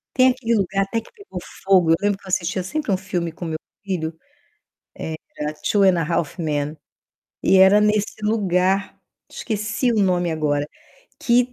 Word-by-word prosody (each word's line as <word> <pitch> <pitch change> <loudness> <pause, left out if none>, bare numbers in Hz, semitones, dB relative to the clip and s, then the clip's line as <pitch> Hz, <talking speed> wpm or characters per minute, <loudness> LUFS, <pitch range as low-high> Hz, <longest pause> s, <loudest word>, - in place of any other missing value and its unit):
Tem 255 0 +6
aquele 245 -3 0
lugar 195 0 +1
até 225 +3 -2
que - - -19
pegou 410 -3 -9 0.2
fogo. 185 -4 +4
Eu - - +7
lembro 205 -1 +1
que - - -26
eu - - -9
assistia 185 0 0
sempre 300 +6 -3
um 190 - +3
filme 175 -3 -3
com 175 - -9
meu 160 -1 -3 0.3
filho, 165 -4 -3 1.2
era, 150 +1 -2
Two 205 -2 +3
and 185 -3 +5
a - - +1
Half 170 +2 -1
Men, 150 -2 -1 0.7
e 195 - +4
era 190 +2 +7
nesse 210 0 +1
lugar, 195 -2 +1 0.3
esqueci 215 +3 -1
o - - -1
nome 175 -2 +1
agora, 145 -2 0 0.5
que 245 +1 +3
190 Hz, 170 wpm, -22 LUFS, 170-210 Hz, 1.2 s, Eu